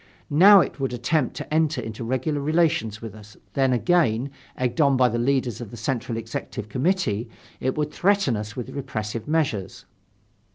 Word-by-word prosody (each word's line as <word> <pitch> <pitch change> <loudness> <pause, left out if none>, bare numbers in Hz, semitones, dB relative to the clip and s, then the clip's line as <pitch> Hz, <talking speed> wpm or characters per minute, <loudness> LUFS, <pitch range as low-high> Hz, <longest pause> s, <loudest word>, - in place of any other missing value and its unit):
Now 195 +6 +8
it - - -4
would 135 -2 -2
attempt 125 +3 0
to - - -6
enter 155 -3 +2
into 110 0 -6
regular 130 +5 -1
relations 155 -8 +1
with 110 -3 -6
us, 105 0 -14 0.2
then 135 -1 +2
again, 135 -3 +2 0.3
egged 125 +5 0
on 140 -2 +4
by 125 -1 +4
the 120 - -2
leaders 125 -1 0
of 115 - -7
the 120 - -10
Central 115 0 -2
Executive 110 -2 -6
Committee, 125 - 0 0.3
it 130 +2 -1
would 150 0 -1
threaten 200 - +2
us 105 0 -5
with 125 - -6
repressive 110 -4 -5
measures. 135 -12 -1
130 Hz, 170 wpm, -24 LUFS, 115-150 Hz, 0.3 s, Now